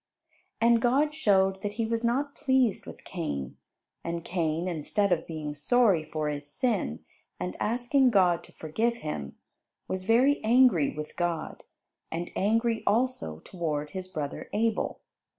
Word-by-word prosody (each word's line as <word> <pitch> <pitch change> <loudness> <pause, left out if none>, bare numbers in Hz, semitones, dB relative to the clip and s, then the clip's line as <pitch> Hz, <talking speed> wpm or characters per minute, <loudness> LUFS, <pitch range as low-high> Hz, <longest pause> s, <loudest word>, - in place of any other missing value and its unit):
And 230 0 +4
God 280 +5 +2
showed 195 -9 +2
that 205 0 -3
He 230 +1 -1
was 230 +1 -1
not 275 +5 0
pleased 260 -8 +1
with - - -10
Cain; 70 - -4 0.5
and 170 0 -4
Cain, 165 -1 -1
instead 180 +4 0
of 165 -2 +1
being 155 -2 -4
sorry 190 +3 +3
for 155 0 -3
his 145 -1 -3
sin, 190 - -1 0.3
and 90 0 -3
asking 245 +4 +2
God 180 -6 +3
to - - -18
forgive 220 +10 -1
him, 70 - -5 0.5
was 185 0 -3
very 255 +7 +4
angry 225 - +5
with 150 0 -7
God, 175 -2 -2 0.5
and 170 +2 -4
angry 225 +3 +1
also 225 - 0
toward 150 -5 -3
his 185 -1 -5
brother 150 -6 -5
Abel. 220 +1 0
190 Hz, 145 wpm, -28 LUFS, 155-235 Hz, 0.5 s, angry